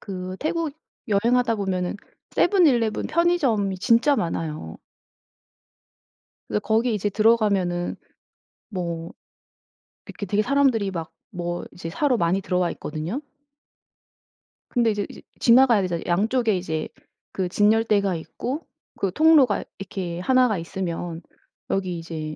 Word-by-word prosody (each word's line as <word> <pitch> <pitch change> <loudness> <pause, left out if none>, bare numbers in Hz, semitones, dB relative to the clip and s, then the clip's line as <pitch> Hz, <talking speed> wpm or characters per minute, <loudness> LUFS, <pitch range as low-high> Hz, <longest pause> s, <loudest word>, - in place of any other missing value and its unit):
그 185 -1 -6
태국 315 -1 -1 0.4
여행하다 235 +3 +2
보면은 185 -2 -2 0.4
세븐일레븐 280 - +3
편의점이 265 - +1
진짜 235 +8 +4
많아요. 155 - -3 1.7
그래서 105 - 0
거기 225 +2 +1
이제 205 0 0
들어가면은 200 -5 +2 0.7
뭐 170 -4 -4 0.9
이렇게 200 - -7
되게 205 +3 +1
사람들이 255 -6 +2
막 165 -3 -5 0.2
뭐 175 -1 -4
이제 165 -2 -7
사러 265 - +1
많이 175 +1 +1
들어와 180 -2 0
있거든요. 160 - -4 1.5
근데 235 -3 +2
이제 205 -1 -2
이제 - - -11 0.2
지나가야 235 -3 +6
되잖아요. 175 -2 -2
양쪽에 220 +4 +2
이제 160 -3 -3 0.4
그 185 -2 -2
진열대가 205 -2 +2
있고 255 - -5 0.4
그 195 -2 0
통로가 305 -7 +5
이렇게 185 -3 -5
1 255 +6 +4
가 215 -5 0
있으면 170 -1 -4 0.5
여기 185 -3 -1
이제 155 -2 -6
200 Hz, 275 characters per minute, -24 LUFS, 175-235 Hz, 1.7 s, 지나가야